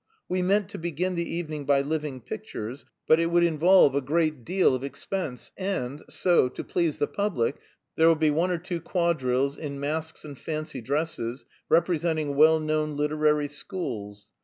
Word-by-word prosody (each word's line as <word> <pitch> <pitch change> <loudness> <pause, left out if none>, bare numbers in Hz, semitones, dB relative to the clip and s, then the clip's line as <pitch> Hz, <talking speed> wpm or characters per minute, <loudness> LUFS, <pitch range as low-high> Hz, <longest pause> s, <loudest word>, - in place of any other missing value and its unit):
We 185 0 0
meant 195 +2 +2
to - - -7
begin 170 +2 -2
the 170 -1 -2
evening 155 -3 -4
by 140 0 +4
living 145 -2 -3
pictures, 115 +4 -7 0.2
but 160 - +5
it 165 - +2
would 170 +1 +3
involve 170 -1 +5
a 140 - +1
great 155 -1 0
deal 180 0 +3
of 130 0 -2
expense, 140 +1 -5
and 155 -8 -3
so, 175 -8 +3
to - - -7
please 170 -4 0
the - - +1
public, 170 - -1 0.4
there 160 - +5
will 165 - +6
be 155 -1 +2
one 165 +5 +1
or 180 - 0
two 175 0 -5
quadrilles 140 -6 0
in 140 -3 -5
masks 155 +3 -3
and 145 -2 -8
fancy 155 -1 -4
dresses, 135 -2 -2 0.2
representing 160 -3 +1
well 160 +2 +6
known 155 -1 -1
literary 150 0 +2
schools. 120 - -6
155 Hz, 170 wpm, -26 LUFS, 140-170 Hz, 0.4 s, will